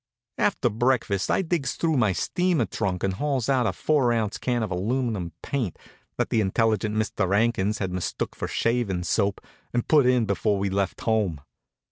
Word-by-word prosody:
After - - +2
breakfast 110 -4 +1
I - - +2
digs 160 -6 -1
through 160 -2 0
my 110 -5 +3
steamer 175 - +1
trunk 90 -1 -2
and 95 - +1
hauls 135 +1 -1
out 130 -4 +3
a - - +1
four 140 -6 +2
ounce 110 -3 -1
can 120 -2 0
of 105 - -4
aluminum 105 -2 -1
paint 125 - -2 0.4
that - - -1
the 110 - +3
intelligent 110 +1 +1
Mr. 105 -3 0
'Ankins 110 -2 +1
had 95 -3 -3
mistook 90 -1 -3
for - - -4
shavin' 115 -7 0
soap 100 +1 0 0.3
and 120 - 0
put 145 -5 +5
in 125 -2 +3
before 100 0 0
we 100 0 -1
left 100 -1 -1
home. 105 -10 0
110 Hz, 175 wpm, -25 LUFS, 95-125 Hz, 0.4 s, put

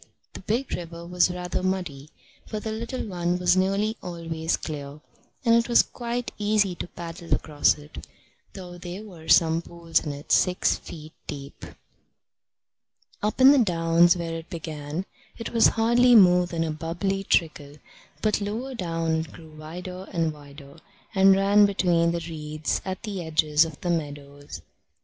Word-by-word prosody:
The - - -8
big 235 +7 -2
river 170 -1 -6
was 180 +1 +2
rather 180 0 -3
muddy, 175 -7 -3 0.4
but 215 -1 -4
the 220 - -3
little 230 +4 -4
one 175 -2 -1
was 180 0 +3
nearly 195 +4 +1
always 165 -2 -3
clear, 145 -2 -7 0.5
and 230 - +5
it 235 +1 +3
was 235 - +6
quite 240 0 -4
easy 205 -2 +2
to 175 - -6
paddle 170 -1 -9
across 150 -1 +1
it, 150 0 -11 0.5
though 180 -2 -9
there 180 +4 -7
were 175 -7 -13
some 165 0 +5
pools 170 -1 -1
in 150 - -3
it 145 +1 -8
six 180 -1 +3
feet 155 -1 -10
deep. 140 -1 -8 1.6
Up 210 +3 -1
in 260 +1 +9
the 285 - +5
downs, 170 -4 +4
where 165 -1 -4
it 165 0 -7
began, 155 +1 -5 0.3
it 230 - -6
was 230 -1 +5
hardly 240 +2 +5
more 180 -4 +6
than 165 -1 -2
a 160 - -2
bubbly 175 +5 -2
trickle, 150 -6 0 0.5
but 215 -1 +1
lower 225 +6 -4
down 165 -6 -1
it 160 -1 -4
grew 160 -2 -13
wider 180 +4 -8
and 165 -3 0
wider, 140 -1 -14 0.3
and 195 0 +6
ran 200 +1 +5
between 175 -4 +2
the 170 -1 -3
reeds 155 -2 -3
at 190 +2 -5
the 200 -5 -4
edges 155 -1 +3
of 160 -3 -9
the 175 - -1
meadows. 145 - -5
175 Hz, 160 wpm, -25 LUFS, 160-195 Hz, 1.6 s, in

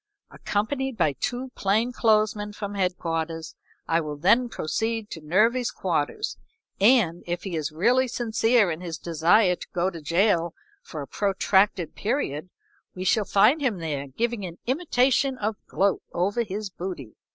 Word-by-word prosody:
Accompanied 260 +4 -2
by 150 - +2
two 250 - -4
plain 215 +5 +1
clothes 215 -3 +3
men 210 0 -6
from 205 -1 -5
headquarters 165 -4 -2 0.3
I 165 +1 +2
will 150 -2 -5
then 235 +10 +3
proceed 220 +5 -2
to 160 - -7
Nervy's 225 +10 +2
quarters, 175 - -2 0.4
and, 200 -6 +4
if 175 0 -3
he 190 -4 -4
is 155 -1 -2
really 240 +11 +2
sincere 225 -3 +2
in 160 +2 -5
his 170 -3 -5
desire 175 +5 +3
to - - -10
go 180 +2 0
to 165 -2 -9
jail 170 +2 +1 0.3
for 155 -4 -7
a - - -10
protracted 195 0 +1
period, 185 - -2 0.5
we 185 - -4
shall 205 +3 +2
find 215 +11 +4
him 245 -8 0
there 150 -4 -4
giving 225 - -2
an 175 -2 -7
imitation 265 -2 +1
of 215 -1 -1
a - - -38
gloat 195 +1 +1
over 200 +7 0
his 205 -2 -4
booty." 175 - -6
200 Hz, 160 wpm, -25 LUFS, 170-230 Hz, 0.5 s, and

